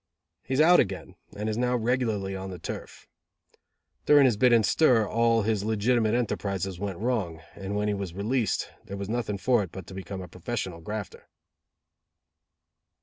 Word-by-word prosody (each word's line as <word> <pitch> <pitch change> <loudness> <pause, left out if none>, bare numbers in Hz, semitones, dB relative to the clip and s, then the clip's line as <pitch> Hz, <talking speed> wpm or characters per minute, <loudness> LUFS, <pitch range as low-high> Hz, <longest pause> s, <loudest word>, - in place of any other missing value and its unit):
He 130 - -3
is 145 - +4
out 175 +3 +7
again, 95 -2 -1 0.2
and 105 +1 -3
is 110 +1 -1
now 125 0 +1
regularly 110 -5 0
on 95 0 -5
the 90 - -6
turf. 85 - -8 1.0
During 145 -2 +7
his 125 -4 +4
bit 125 +4 +4
in 115 -2 +5
stir 115 -3 +4
all 115 0 +2
his 105 -2 0
legitimate 110 +1 +2
enterprizes 100 -6 -2
went 100 -3 -3
wrong, 105 -8 -1
and 100 0 -5
when 105 0 0
he 105 - +1
was 100 -4 -5
released, 110 +4 -1
there 100 - -6
was 100 0 -5
nothing 110 -3 -2
for 120 +5 +2
it 95 -5 -5
but 95 -2 -8
to 95 - -11
become 95 0 -6
a - - -8
professional 90 -1 -5
grafter. 105 +2 -6
105 Hz, 175 wpm, -27 LUFS, 95-120 Hz, 1.0 s, out